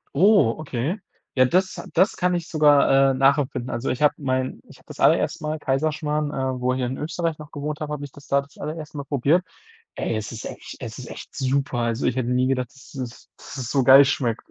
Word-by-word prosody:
Oh, 175 - +5
okay. 150 - -2 0.4
Ja, 130 -1 +5
das 185 +8 +1
das 185 +4 +4
kann 180 0 +1
ich 170 -1 -3
sogar, 145 -3 +5
äh, - - -1
nachempfinden. 135 -2 +1
Also, 120 - -2
ich 130 +4 -1
habe 150 - +5
mein 130 -2 -2
ich - - -15
habe - - -24
das - - -12
allererste - - +3
Mal 155 +1 -2
Kaiserschmarrn, 150 +1 -1
äh, 130 -3 -2
wo 125 +1 +1
ich - - -2
hier 130 - -1
in 130 +2 -3
Österreich 165 +1 -2
noch 150 -1 -10
gewohnt 150 +1 -4
habe, 150 -1 -4
habe 145 -1 -4
ich 140 - -11
das 145 +1 -15
da 140 0 +3
das 140 0 -18
allererste 155 0 -6
Mal 140 - -5
probiert. 145 +6 +2 0.5
Ey, - - -2
es 110 -1 -5
ist 115 - -7
echt - - -8
es - - -7
ist - - -8
echt - - -10
super. 135 -1 0
Also, 115 -1 0
ich 125 - 0
hätte 125 -2 -1
nie 125 +1 +2
gedacht, 125 -2 -1
dass 135 0 -16
es 125 -3 -7
dass - - -10
es 125 -3 -4
so 135 -1 +2
geil 135 +3 +9
schmeckt. 125 -5 -1
140 Hz, 235 wpm, -23 LUFS, 130-150 Hz, 0.5 s, geil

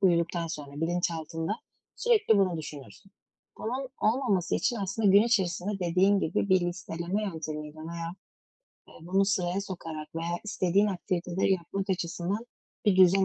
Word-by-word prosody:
uyuduktan 170 -2 +2
sonra 150 -3 -6
bilinçaltında 165 0 -1 0.4
sürekli 430 - +4
bunu 185 -3 +2
düşünürsün. 150 +6 -9 0.5
Bunun 255 +4 -3
olmaması 215 -6 +2
için 240 - +1
aslında 200 +1 0
gün 200 +2 +8
içerisinde, 195 -3 +1
dediğin 185 +3 +3
gibi, 180 +4 0
bir 185 -1 +5
listeleme 175 +2 -2
yöntemiyle 155 -4 -5
veya, 165 +1 -5 0.7
ııı, - - -15
bunu 195 +2 +3
sıraya 195 -2 0
sokarak 165 -6 -6
veya 170 +1 -2
istediğin 200 -1 +2
aktiviteleri 180 -1 0
yapmak 190 +2 -2
açısından 180 +4 -2 0.4
bir 205 -4 +4
düzen 190 +1 +6
180 Hz, 130 wpm, -29 LUFS, 170-200 Hz, 0.7 s, gün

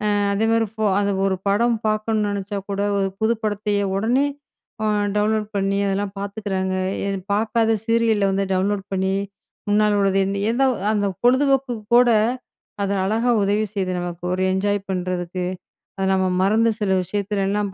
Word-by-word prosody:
அ - - +1 0.2
அதேமாதிரி 225 +1 +2
ஃபோ 220 -1 -2
அது 200 0 +1
ஒரு 190 -1 +1
படம் 230 +3 +2
பார்க்கணும் 215 0 0
நெனைச்சா 200 0 -3
கூட, 200 - -3 0.2
ஒரு 195 -1 +1
புது 230 +2 +2
படத்தையே, 205 -1 0
உடனே 245 +7 +2 0.6
அ, - - +1 0.3
டவுன்லோட் 215 0 +1
பண்ணி, 195 0 0
அதெல்லாம் 195 0 -1
பாத்துக்கிறாங்க. 200 -2 -3 0.3
எ - - 0 0.2
பாக்காத 225 +1 +2
சீரியல்ல 230 -3 +2
வந்து, 195 0 0
டவுன்லோட் 195 +1 0
பண்ணி, 190 0 0 0.5
முன்னால 210 0 +3
உள்ளது 195 0 +2 0.3
எந்த 265 +3 +1 0.3
அந்த 205 -1 +1 0.2
பொழுதுபோக்குக்கு 260 -3 +2
கூட, 245 0 +6 0.7
அதை 200 0 0
அழகா 225 +4 +1
உதவி 205 +2 +1
செய்யுது 185 -2 -1
நமக்கு. 175 0 -6
ஒரு 185 0 0
என்ஜாய் 205 +1 0
பண்ணுறதுக்கு. 180 -1 -2 0.5
அது 190 0 0
நம்ம 190 0 +2 0.2
மறந்த 225 +3 +3
சில 200 -2 0
விஷயத்துலலாம் 200 +1 -1
205 Hz, 145 wpm, -22 LUFS, 195-220 Hz, 0.7 s, கூட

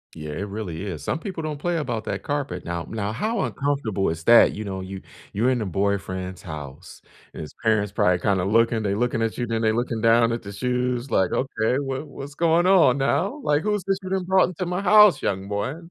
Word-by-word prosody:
Yeah, 75 -2 -7
it 100 +7 -4
really 100 -5 -5
is. 85 -6 -6
Some 160 - -2
people 175 -3 -6
don't 150 -2 -4
play 175 +2 -1
about 120 -8 -3
that - - -4
carpet. 140 -12 -3
Now 85 0 -3
now, 105 -2 -3
how 215 - -1
uncomfortable 135 -9 -1
is 80 0 -4
that? 120 +6 +6
You 110 - -5
know, 95 -2 -5
you 95 0 -7 0.3
you're 115 +6 +2
in 125 -2 0
a 105 - -2
boyfriend's 95 -1 -2
house, 75 -6 -9 0.3
and - - -8
his 75 - -9
parents 110 -3 +2
probably 90 -3 +2
kinda 95 -1 0
looking, 115 +3 +2
they 100 -2 -1
looking 120 +1 0
at 115 -1 -1
you, 120 - -1
then 115 -1 -2
they 110 -1 +3
looking 115 0 -2
down 115 +1 +4
at 115 - -2
the 100 - -8
shoes, 125 +3 -2
like, 95 -4 +2
"Okay. 125 -2 0
What 135 +1 -3
what's 140 0 -9
going 170 +2 +2
on 170 -9 +5
now? 155 - 0
Like, 150 -4 +2
who's 210 0 -1
this 195 -1 -1
being 190 -1 -2
brought 190 +1 +3
into 180 +1 -4
my 180 +2 -2
house, 210 0 +6
young 95 0 -2
boy?" 105 +7 -2
115 Hz, 225 wpm, -24 LUFS, 100-145 Hz, 0.3 s, that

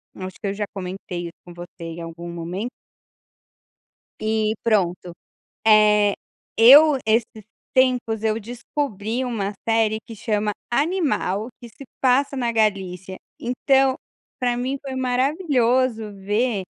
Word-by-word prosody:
acho 185 0 -7
que - - -3
eu 195 - -1
já 205 +1 -3
comentei 180 -2 -5
isso 170 - -10
com 175 - -11
você 175 0 -11
em 165 0 -6
algum 165 +1 -7
momento. 175 +7 -4 1.5
E 215 0 0
pronto, 180 -5 0 0.5
eh. 210 -1 +5 0.4
Eu 285 +6 +8
esses 220 -1 0 0.3
tempos, 250 -4 +2
eu 220 0 +1
descobri 235 0 -3
uma 210 -5 -2 0.2
série 225 -1 +2
que 230 - -9
chama 210 -1 -1 0.2
Animal 280 - 0
que 240 - -10
se 255 +5 -13 0.2
passa 270 +2 +2
na 240 -3 0
Galícia, 190 -4 -1 0.2
então, 265 +2 +2 0.4
pra 245 -1 0
mim 260 +3 -2
foi 270 -2 -6
maravilhoso 255 - +1
ver 205 +2 -1
220 Hz, 125 wpm, -22 LUFS, 195-250 Hz, 1.5 s, Eu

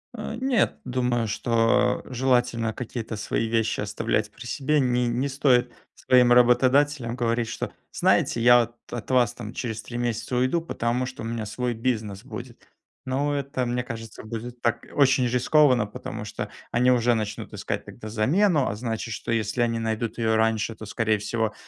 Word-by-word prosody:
Нет, 235 +3 0
думаю, 125 -2 0
что 115 +3 +2
желательно 125 -3 +1
какие-то 115 -2 -5
свои 105 +2 -1
вещи 115 -1 0
оставлять - - -1
при - - -12
себе. 150 +2 0
Не 125 -2 +1
не 120 +4 0
стоит 130 -3 +2 0.2
своим 125 -1 +4
работодателям 125 +1 +4
говорить, 120 -1 0
что: - - -4 0.2
"Знаете, 115 - +2
я 120 +1 +7
вот 120 0 -5 0.2
от 120 +1 -5
вас 120 -2 +3
там 115 -3 -8
через 110 -3 -4
3 120 - -7
месяца 120 +1 -2
уйду, 130 +7 +2
потому 125 -5 -1
что 130 -2 -7
у - - -5
меня 115 -1 -3
свой 120 +4 -2
бизнес 110 -4 -2
будет". 125 -2 -9 0.4
Но 140 +3 0
это, 140 -2 -2
мне 125 +1 -1
кажется, 115 -2 -8
будет 115 +2 -7
так 115 - 0
очень 130 -3 +4
рискованно, 125 0 +4
потому 105 +1 -7
что 105 0 -5 0.2
они 125 +2 +3
уже 120 -1 +3
начнут 110 -2 -4
искать - - -4
тогда 110 - -9
замену, 145 - +2
а - - -2
значит, 115 0 -4
что 105 - -5
если 115 +1 0
они 115 -1 +1
найдут 115 0 -2
ее 110 -1 +1
раньше, 110 0 +1
то, 110 - -9
скорее 110 +1 0
всего, 110 +1 -1
120 Hz, 170 wpm, -25 LUFS, 115-130 Hz, 0.4 s, я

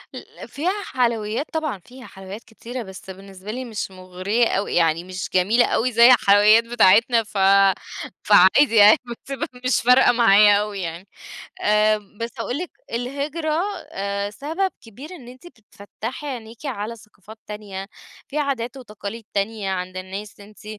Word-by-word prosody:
ال - - -11
فيها 330 +6 -2 0.2
حلويّات 235 +1 0
طبعًا، 310 -11 -2
فيها 255 +6 -15
حلويّات 195 +3 -10
كتيرة 235 +2 -8
بس 190 0 -12
بالنسبة 195 +1 -10
لي 255 +2 -5
مش 215 -4 -5
مُغريّة 185 +5 -1
أوي، 200 - -2
يعني 165 0 +2
مش 185 0 -6
جميلة 210 +7 +3
أوي 250 +2 0
زي 235 +1 +6
الحلويّات 210 0 +5
بتاعتنا 230 0 +4
ف 210 -1 -9 0.9
فعادي 210 +6 +5
يعني 210 0 +8
بتبقى 275 +6 -6 0.2
مش 255 - +2
فارقة 250 +1 +5
معايا 210 -3 +5
أوي 210 -1 -4
يعني، 170 +3 -6 0.5
آآ، 210 +1 +3 0.2
بس 230 +1 -4
أقول 245 +4 -3
لِك 355 +1 -6 0.2
الهجرة 290 +7 -2 0.3
آآ، 200 +1 -3
سبب 320 - -3
كبير 255 - -12
إن 245 -7 -13
أنتِ 255 +7 -13
بتفتّحي 225 +3 -9
عينيكِ 235 0 -8
على 230 -3 -4
ثقافات 215 0 -16
تانية، 200 -2 -7 0.4
في 300 - -6
عادات 270 -3 -2
وتقاليد 215 -2 -8
تانية 200 -1 -2
عند 185 0 -4
الناس 195 +3 -8
أنتِ 210 +1 -16
220 Hz, 145 wpm, -22 LUFS, 200-250 Hz, 0.9 s, يعني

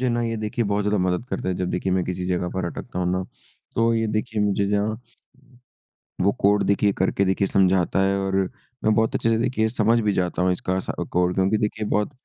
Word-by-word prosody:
मुझे 130 - +1
ना 120 0 0
ये 115 -1 -2
देखिए 110 +2 -2
बहुत 100 0 0
ज़्यादा 105 -1 +1
मदद 90 +4 0
करता - - -2
है। 90 - 0
जब 90 0 -2
देखिए 90 +1 -1
मैं 95 -1 +1
किसी 90 0 -3
जगह 90 -1 -1
पर 95 -2 -1
अटकता 85 +1 -6
हूँ 90 0 0
ना 95 0 -1 0.5
तो 115 0 +3
ये 115 -1 +1
देखिए 110 0 -2
मुझे 100 -1 +1
जहाँ 105 +2 0 1.2
वो 100 +2 +3
कोड 100 +1 +4
देखिए 100 0 +2
करके 95 +1 +1
देखिए 95 +1 +1
समझाता 95 -1 +2
है 100 0 +2
और 95 0 -2 0.5
मैं 110 0 +4
बहुत 110 0 +1
अच्छे 115 - +1
से 115 - +2
देखिए 115 -2 +1
समझ 115 0 +2
भी 105 -2 +1
जाता 90 -1 -1
हूँ 90 - +3
इसका 90 +1 -2
असा 95 - -3
कोड 90 0 +2
क्योंकि 95 +3 +2
देखिए 105 0 -2
बहुत 105 +5 0
100 Hz, 225 wpm, -23 LUFS, 95-110 Hz, 1.2 s, कोड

